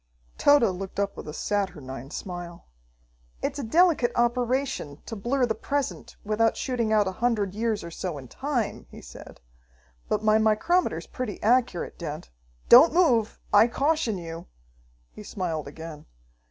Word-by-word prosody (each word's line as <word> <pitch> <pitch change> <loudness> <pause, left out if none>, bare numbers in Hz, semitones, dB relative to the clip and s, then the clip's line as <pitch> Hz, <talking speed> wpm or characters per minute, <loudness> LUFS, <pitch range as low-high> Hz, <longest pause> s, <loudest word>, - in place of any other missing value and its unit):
Tode 285 -2 +6
looked 195 +1 -6
up 200 0 -1
with - - -9
a - - -5
saturnine 150 -9 -3
smile. 175 0 -7 0.8
"It's 280 0 -2
a - - -3
delicate 315 0 +3
operation 240 - 0
to 225 - -6
blur 245 +5 0
the 225 - -1
present 280 +5 -3
without 215 +2 +1
shooting 240 -4 -1
out 210 -2 +3
a - - -1
hundred 215 -6 +1
years 220 0 -1
or 170 - -8
so 170 -2 -4
in 130 -2 -9
time," 265 - -3
he - - -12
said, - - -13 0.7
"but 215 - 0
my 215 0 +4
micrometer's 220 +12 +1
pretty 250 -6 -5
accurate, 230 -5 +1
Dent. 150 - -6 0.4
Don't 285 +8 +8
move, 240 -12 +3
I 210 +3 +7
caution 275 -3 0
you!" 165 0 -8 0.6
He - - -11
smiled 170 -8 -4
again. 155 0 -9
215 Hz, 150 wpm, -26 LUFS, 175-250 Hz, 0.8 s, Don't